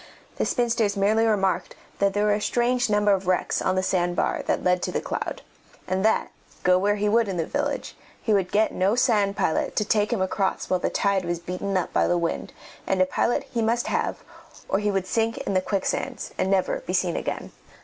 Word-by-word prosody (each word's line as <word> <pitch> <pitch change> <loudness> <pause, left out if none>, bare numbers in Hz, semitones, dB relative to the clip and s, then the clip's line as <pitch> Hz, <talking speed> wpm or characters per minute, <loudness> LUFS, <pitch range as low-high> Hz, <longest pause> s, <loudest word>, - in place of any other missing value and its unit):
The - - 0
spinsters 230 -4 +1
merely 215 +3 +3
remarked 195 -3 0 0.2
that 200 -1 +2
there 205 0 +2
were 210 - +3
a 205 - -1
strange 245 +1 +1
number 205 0 +3
of 190 -1 -2
wrecks 185 -1 +1
on 185 - +1
the 185 - +1
sand 175 -2 0
bar - - 0
that - - 0
led 180 0 +2
to - - -2
The - - -1
Cloud, - - -4 0.4
and 185 +1 0
that, 220 0 +2 0.3
go 180 0 +4
where 205 +2 +2
he 210 0 0
would 225 +1 +3
in 190 -2 -3
the 165 - 0
village, - - -3 0.2
he 220 - 0
would 190 -3 +1
get 215 +2 +2
no 195 +4 +2
sand 210 -5 +2
pilot 160 - 0
to 210 - +1
take 210 +1 +1
him 235 - 0
across 190 0 -1
while 185 - +3
the - - 0
tide 200 -2 +1
was 175 0 -2
beaten 180 +3 -3
up 180 - -2
by - - +3
the 175 - +2
wind, 170 -1 -2 0.4
and 190 - +1
a 185 - +5
pilot 235 +7 0
he 235 - -1
must 230 +2 +1
have, - - -2 0.4
or 195 - +1
he 210 0 0
would 195 -2 0
sink 225 +3 0
in - - -3
the 185 - +3
quicksands 195 0 -2
and 190 - 0
never 195 - +1
be - - -5
seen - - +1
again. - - -4
200 Hz, 225 wpm, -25 LUFS, 185-220 Hz, 0.4 s, a